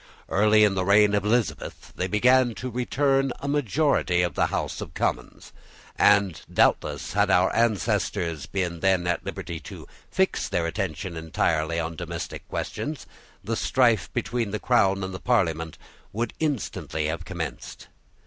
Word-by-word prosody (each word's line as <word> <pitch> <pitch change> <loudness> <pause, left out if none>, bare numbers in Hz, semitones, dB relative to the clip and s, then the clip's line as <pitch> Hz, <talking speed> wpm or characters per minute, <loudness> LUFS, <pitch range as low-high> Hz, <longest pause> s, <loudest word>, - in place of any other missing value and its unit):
Early 105 +2 +4
in 105 -2 +4
the 95 -1 0
reign 100 +2 +5
of 100 -1 +1
Elizabeth 115 +1 -2
they 90 - -1
began 125 +3 +3
to 130 +3 -5
return 135 +2 +1
a 140 - -5
majority 140 - +1
of 85 -4 -1
the - - +1
House - - -3
of - - -8
Commons. - - -3 0.4
And 100 -4 +3
doubtless - - +1
had - - +2
our 90 +1 +3
ancestors 90 - 0
been 90 -3 -2
then 95 -2 +2
at 85 -1 -1
liberty 85 -2 -5
to - - -10 0.2
fix 190 0 0
their 85 -1 0
attention 85 0 -3
entirely 80 0 0
on 85 0 -3
domestic 85 0 -6
questions, 150 -2 -4 0.4
the 115 - -2
strife 120 -4 +2
between 120 -3 -2
the 110 +1 -3
Crown 100 -6 +2
and 95 0 -4
the 95 - -6
Parliament 80 -9 0 0.4
would 115 +2 -2
instantly 130 - -2
have 80 +2 -3
commenced. 80 -9 -6
100 Hz, 150 wpm, -25 LUFS, 85-120 Hz, 0.4 s, reign